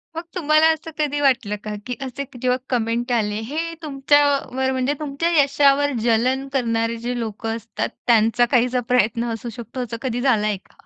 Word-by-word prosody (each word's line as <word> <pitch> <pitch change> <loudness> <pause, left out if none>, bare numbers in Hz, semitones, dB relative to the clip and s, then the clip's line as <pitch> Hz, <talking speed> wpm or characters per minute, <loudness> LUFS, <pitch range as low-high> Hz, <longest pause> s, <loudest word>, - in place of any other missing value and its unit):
मग 330 - -3
तुम्हाला 310 -1 +4
असं 320 +1 -8
कधी 290 -1 0
वाटलं 245 -7 +2
का 210 -1 -4
की 250 -1 -4
असे 270 +1 -4 0.2
जेव्हा 250 0 +2
कमेंट 240 0 -1
आले. 210 -3 +1
हे 320 +8 -3
तुमच्यावर 275 -2 +1
म्हणजे 260 +2 0
तुमच्या 300 +3 -1
यशावर 285 0 +3
जलन 250 +4 +1
करणारे 230 -2 0
जे 245 0 -2
लोकं 225 0 -3
असतात, 230 0 -4 0.2
त्यांचा 230 +1 +4
काहीसा 250 0 +3
प्रयत्न 235 -1 +1
असू 235 +1 -6
शकतो. 235 +2 -7
असं 230 -1 -5
कधी 245 -2 -2
झालाय 215 -6 +2
का? - - -25
250 Hz, 165 wpm, -21 LUFS, 230-280 Hz, 0.2 s, तुम्हाला